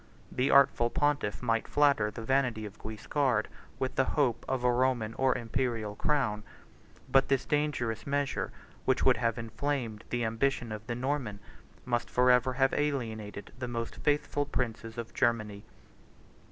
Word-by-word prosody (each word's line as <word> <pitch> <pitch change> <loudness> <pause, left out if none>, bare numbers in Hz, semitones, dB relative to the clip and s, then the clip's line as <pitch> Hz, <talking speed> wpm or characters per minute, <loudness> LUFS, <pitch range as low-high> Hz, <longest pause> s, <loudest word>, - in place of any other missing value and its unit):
The 130 +2 +1
artful 140 -4 +5
pontiff 145 -7 0
might 115 -2 +1
flatter 140 -7 +3
the 110 +2 -7
vanity 125 -4 +1
of 105 0 -10
Guiscard 110 +1 0 0.3
with 130 - -2
the 130 - +3
hope 125 -6 +2
of 130 -1 -1
a 125 - +4
Roman 120 -3 +1
or 130 +2 +2
Imperial 115 -3 -2
crown; 125 -9 0 0.7
but 135 0 +4
this 135 -2 +1
dangerous 140 -7 -1
measure, 140 0 -1 0.3
which - - +2
would - - +5
have 115 -1 0
inflamed 115 -1 -3
the 120 -1 0
ambition 115 +1 0
of 110 0 -7
the 120 - -2
Norman, 125 -5 -2 0.5
must 120 -2 -1
forever 125 0 +4
have 135 +1 +2
alienated 110 -8 -3
the 125 - -3
most 115 -1 -4
faithful 145 -1 0
princes 115 -4 -3
of 115 -1 -6
Germany. 110 -4 0
120 Hz, 150 wpm, -30 LUFS, 110-135 Hz, 0.7 s, artful